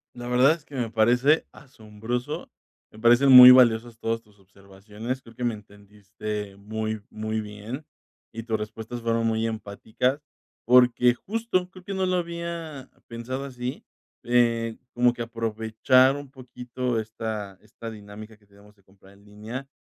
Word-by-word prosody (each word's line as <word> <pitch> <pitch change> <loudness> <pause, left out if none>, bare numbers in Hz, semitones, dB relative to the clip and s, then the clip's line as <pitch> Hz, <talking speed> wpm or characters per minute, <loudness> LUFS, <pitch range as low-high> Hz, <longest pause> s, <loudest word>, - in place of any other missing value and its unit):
La 120 0 -8
verdad 125 +3 +4
es 165 -1 -3
que 145 - -13
me 120 -3 -2
parece 125 +7 +3
asombroso. 115 -2 -6 0.4
Me 110 - -15
parecen 120 +4 +5
muy 125 0 +12
valiosas 120 -2 +5
todas 115 0 -2
tus 105 -2 -26
observaciones. 100 +6 -8
Creo 115 -1 -16
que 125 - -6
me 120 -2 0
entendiste 105 0 -8
muy 110 +1 -5
muy 110 0 -3
bien 105 +7 -8 0.5
y 115 0 -7
tus 110 -2 -1
respuestas 110 +3 -7
fueron 115 0 0
muy 115 0 0
empáticas, 110 +5 -3 0.4
porque 125 0 +5
justo 195 - -2
creo 185 -1 -14
que 195 - -6
no 190 0 0
lo 185 0 +1
había 170 -5 -6 0.2
pensado 125 +3 -5
así, 125 -1 -6 0.4
eh, 115 -2 +1 0.2
como 120 0 +3
que 120 -1 -5
aprovechar 115 +3 +2
un 145 -2 -8
poquito 125 -2 -4
esta 110 -3 -6
esta 115 +2 -10
dinámica 105 0 -11
que 105 - -29
tenemos 100 +1 -21
de 100 - -30
comprar 95 0 -21
en 100 +1 -22
línea, 110 +6 -8
115 Hz, 155 wpm, -25 LUFS, 105-125 Hz, 0.5 s, muy